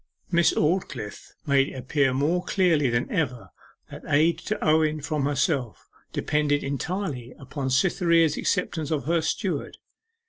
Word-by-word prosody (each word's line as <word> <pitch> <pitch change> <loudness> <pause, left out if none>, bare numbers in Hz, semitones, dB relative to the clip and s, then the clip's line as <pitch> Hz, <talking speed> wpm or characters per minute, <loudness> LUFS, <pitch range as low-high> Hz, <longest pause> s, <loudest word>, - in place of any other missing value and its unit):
Miss 170 -1 +4
Aldclyffe 150 - -2
made 140 -2 +3
it - - -10
appear 135 +1 +1
more 150 +7 +1
clearly 170 -8 +2
than 120 0 0
ever 130 -7 -2 0.4
that - - -9
aid 155 +4 +3
to 215 - -3
Owen 155 0 +3
from 145 -1 -2
herself 140 -4 -1 0.2
depended 150 -1 0
entirely 140 -3 -4
upon 135 0 -5
Cytherea's 165 +2 +3
acceptance 160 -5 -1
of 150 -6 -1
her 165 +2 +2
steward. - - -2
150 Hz, 135 wpm, -25 LUFS, 135-165 Hz, 0.4 s, Miss